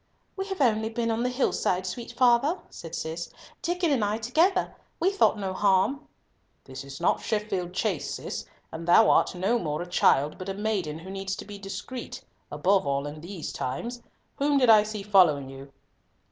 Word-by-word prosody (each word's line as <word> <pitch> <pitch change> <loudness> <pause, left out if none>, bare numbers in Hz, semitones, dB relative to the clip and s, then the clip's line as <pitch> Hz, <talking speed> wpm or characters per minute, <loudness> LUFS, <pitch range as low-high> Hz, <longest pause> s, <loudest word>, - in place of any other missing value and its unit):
"We 385 0 -4
have 385 -6 -4
only 220 -3 +2
been 230 0 -1
on 225 +1 -1
the 250 - +1
hillside, 190 -7 0
sweet 235 +6 -6
father," 255 +8 +3
said 165 0 -8
Cis, 165 +2 -4 0.3
"Diccon 350 -2 0
and 255 -6 +2
I 205 +1 0
together. 325 - +1 0.2
We 370 +3 +2
thought 395 - +3
no 195 -2 -3
harm." 200 +9 +2 0.6
"This 130 0 -9
is 140 0 -9
not 170 - +1
Sheffield 205 -5 -2
Chase, 185 -5 -1
Cis, - - -6 0.2
and 165 +1 -7
thou 215 +5 +6
art - - +3
no 195 +7 +1
more 155 -2 -2
a - - -10
child, 150 -3 +2
but 185 +1 -6
a 195 - -3
maiden 200 -7 -2
who 180 +4 -9
needs 195 0 -3
to - - -8
be 205 -1 -9
discreet, 200 +6 -7 0.3
above 185 +3 +2
all 140 0 0
in 150 +1 -7
these 175 -1 -6
times. 235 - -4 0.4
Whom 285 0 +2
did 250 -4 +6
I 215 -1 +8
see 210 -1 -5
following 165 -10 +4
you?" 135 +1 -11
200 Hz, 190 wpm, -27 LUFS, 175-240 Hz, 0.6 s, I